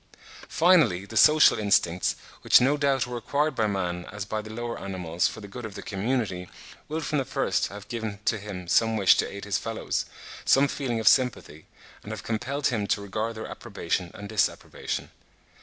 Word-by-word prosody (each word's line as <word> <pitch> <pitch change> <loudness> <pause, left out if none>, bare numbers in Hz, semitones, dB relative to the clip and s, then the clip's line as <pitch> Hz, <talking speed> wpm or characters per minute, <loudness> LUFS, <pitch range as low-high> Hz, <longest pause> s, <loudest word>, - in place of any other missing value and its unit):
Finally 155 - +4
the 110 - -11
social 150 +7 +6
instincts, 95 -4 +2 0.3
which - - +6
no 135 +4 +3
doubt 140 -4 +1
were 125 0 -5
acquired 145 +6 0
by 110 -4 +1
man 90 -3 -2
as 100 0 -5
by 110 +1 -3
the 110 - -11
lower 120 +1 -5
animals 90 -3 -1
for 110 - -7
the 100 - -9
good 120 +5 -8
of 110 -3 -7
the - - -7
community, 100 -3 -2 0.4
will 155 +2 -3
from 150 -1 -1
the - - 0
first - - 0
have 105 0 -10
given 110 -2 -4
to 115 - +1
him 95 -3 -7
some 115 +5 +3
wish 100 -3 +6
to - - -1
aid 100 +1 -7
his 100 -2 0
fellows, 115 -1 -3 0.4
some 140 +1 +4
feeling 125 -5 -2
of 110 - -2
sympathy, 120 - +2 0.3
and 105 - -9
have 110 -1 -6
compelled 135 +5 -3
him 105 -4 -1
to - - +1
regard 110 +3 -3
their 110 - -6
approbation 85 +1 -3
and 100 - -8
disapprobation. 110 -1 -2
110 Hz, 190 wpm, -26 LUFS, 100-125 Hz, 0.4 s, social